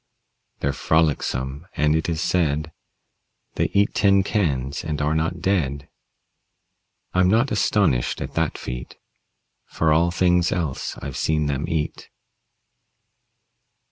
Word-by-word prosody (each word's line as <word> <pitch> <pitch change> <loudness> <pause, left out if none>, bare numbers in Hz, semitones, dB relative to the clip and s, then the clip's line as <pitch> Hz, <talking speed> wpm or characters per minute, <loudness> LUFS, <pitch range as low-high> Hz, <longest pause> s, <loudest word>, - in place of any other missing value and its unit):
They're 70 - 0
frolicsome, 70 -1 0
and 75 +1 +2
it 80 +1 0
is 80 -1 -1
said 80 -3 0 0.8
They - - 0
eat 100 +1 +2
tin 100 -1 +4
cans 70 -10 -1
and 75 -2 -3
are 75 +1 +1
not 80 +2 -1
dead. 75 -8 -1 1.2
I'm 90 0 +4
not 115 +7 +3
astonished 100 -11 +1
at - - -5
that 80 -2 0
feat, 60 0 -7 0.7
For 80 -1 +1
all 85 +2 +3
things 90 0 +2
else 80 -7 -3
I've 70 -2 -5
seen 75 -1 +1
them 70 +1 -1
eat. 80 -1 -3
80 Hz, 120 wpm, -23 LUFS, 70-90 Hz, 1.2 s, tin